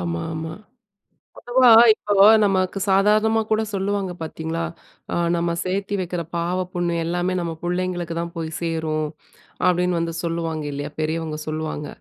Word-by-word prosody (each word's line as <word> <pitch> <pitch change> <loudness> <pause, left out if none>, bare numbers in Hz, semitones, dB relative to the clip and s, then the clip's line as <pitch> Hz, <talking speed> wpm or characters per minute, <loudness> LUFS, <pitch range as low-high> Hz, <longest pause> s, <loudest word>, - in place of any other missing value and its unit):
ஆமா 85 -1 -2
ஆமா. 160 0 -5 0.9
பொதுவா 245 +1 +4 0.2
இப்போ 210 -1 -3 0.3
நமக்கு 190 -1 +1
சாதாரணமா 215 +3 +3
கூட 220 0 +3
சொல்லுவாங்க 195 -1 -1
பாத்தீங்களா, 160 +1 -4 0.5
அ - - 0 0.2
"நம்ம 170 0 0
சேத்தி 195 +2 -2
வெக்குற 175 -1 -3
பாவ, 170 +2 -1 0.2
புண்ணியம் 175 -1 -1
எல்லாமே 175 +2 -1
நம்ம 165 -1 -3
புள்ளைங்களுக்கு 175 -1 -2
தான் 170 0 -6
போய் 160 -1 -3
சேரும்" 160 -2 -1 0.6
அப்டின்னு 180 -1 +2
வந்து 165 0 -2
சொல்லுவாங்க 165 -2 -2
இல்லையா, 145 +1 -5
பெரியவங்க 155 0 -2
சொல்லுவாங்க. 155 -1 -4
170 Hz, 135 wpm, -22 LUFS, 160-190 Hz, 0.9 s, பொதுவா